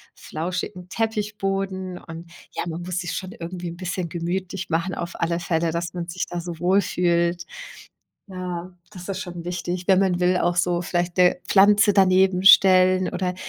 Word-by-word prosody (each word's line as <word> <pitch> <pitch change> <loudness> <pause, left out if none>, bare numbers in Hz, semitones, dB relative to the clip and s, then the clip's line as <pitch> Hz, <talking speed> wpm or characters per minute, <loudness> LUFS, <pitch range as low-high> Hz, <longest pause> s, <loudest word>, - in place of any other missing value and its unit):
flauschigen 180 +2 -5
Teppichboden. 195 -4 -2
Und 165 0 -11 0.2
ja, - - -3
man 165 +1 -5
muss 180 0 -3
sich 175 -1 -4
schon 185 0 -5
irgendwie 175 +1 -6
'n 170 - -9
bisschen 180 -1 -4
gemütlich 180 +3 -4
machen 170 +3 -1
auf 170 0 -5
alle 170 0 0
Fälle, 165 -1 0
dass 170 +1 -3
man 175 -1 -5
sich 175 +1 -3
da 175 - -4
so 170 -1 -7
wohlfühlt. 175 -2 +1 0.8
Ja, 180 -1 -6 0.2
das 180 -3 -10
ist 195 0 -4
schon 175 -3 -7
wichtig, 175 0 -4
wenn 190 -1 +5
man 185 -2 +1
will 180 0 +2
auch 175 -1 +1
so 175 0 +1
vielleicht 175 0 -2
'ne 180 -1 +4
Pflanze 205 +2 +5
daneben 190 -1 +4
stellen. 185 -1 +6
Oder 180 0 -2
180 Hz, 170 wpm, -23 LUFS, 175-190 Hz, 0.8 s, stellen